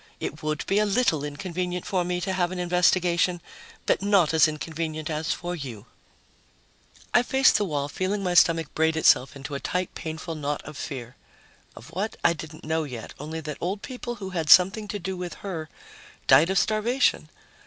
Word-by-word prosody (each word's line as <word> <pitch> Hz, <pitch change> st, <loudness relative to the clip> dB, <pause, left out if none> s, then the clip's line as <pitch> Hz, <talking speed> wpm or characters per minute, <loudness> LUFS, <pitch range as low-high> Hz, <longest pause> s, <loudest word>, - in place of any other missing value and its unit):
It 150 Hz, -, -5 dB
would 155 Hz, -1 st, -2 dB
be 195 Hz, +2 st, +2 dB
a 215 Hz, -, +3 dB
little 200 Hz, -, +2 dB
inconvenient 180 Hz, +4 st, -4 dB
for 185 Hz, -2 st, 0 dB
me 180 Hz, 0 st, -2 dB
to 190 Hz, +2 st, -2 dB
have 180 Hz, -1 st, 0 dB
an 185 Hz, -, -4 dB
investigation... 180 Hz, 0 st, +2 dB, 0.5 s
but -, -, +2 dB
not 195 Hz, -6 st, +3 dB
as 160 Hz, -1 st, +6 dB
inconvenient 155 Hz, 0 st, -4 dB
as 155 Hz, +1 st, -2 dB
for 175 Hz, 0 st, -3 dB
you." 125 Hz, -, -7 dB, 1.3 s
I 245 Hz, -, +6 dB
faced 265 Hz, +2 st, +4 dB
the 210 Hz, -, 0 dB
wall, 145 Hz, -5 st, -2 dB
feeling 190 Hz, +6 st, -2 dB
my 180 Hz, -1 st, 0 dB
stomach 165 Hz, -3 st, +4 dB
braid 160 Hz, 0 st, +1 dB
itself 135 Hz, -4 st, +4 dB
into 140 Hz, +1 st, -7 dB
a 140 Hz, -, -2 dB
tight, 180 Hz, +4 st, -2 dB
painful 160 Hz, +1 st, -5 dB
knot 150 Hz, -1 st, -3 dB
of 155 Hz, -, -10 dB
fear. 130 Hz, -4 st, -7 dB, 0.6 s
Of 125 Hz, -, -12 dB
what, 195 Hz, +6 st, -3 dB
I 170 Hz, -, +5 dB
didn't 155 Hz, -1 st, -10 dB
know 160 Hz, +1 st, 0 dB
yet, 125 Hz, -6 st, -7 dB
only 160 Hz, +3 st, -5 dB
that 150 Hz, -1 st, -6 dB
old 195 Hz, +4 st, -3 dB
people 245 Hz, -1 st, -5 dB
who 195 Hz, -4 st, -7 dB
had 165 Hz, -4 st, -2 dB
something 190 Hz, +6 st, +6 dB
to 205 Hz, -, -3 dB
do 190 Hz, 0 st, -4 dB
with 180 Hz, -1 st, -5 dB
her 160 Hz, -5 st, -4 dB, 0.6 s
died 165 Hz, +4 st, +6 dB
of 190 Hz, -, +1 dB
starvation. 230 Hz, +6 st, +1 dB
170 Hz, 185 wpm, -26 LUFS, 155-190 Hz, 1.3 s, as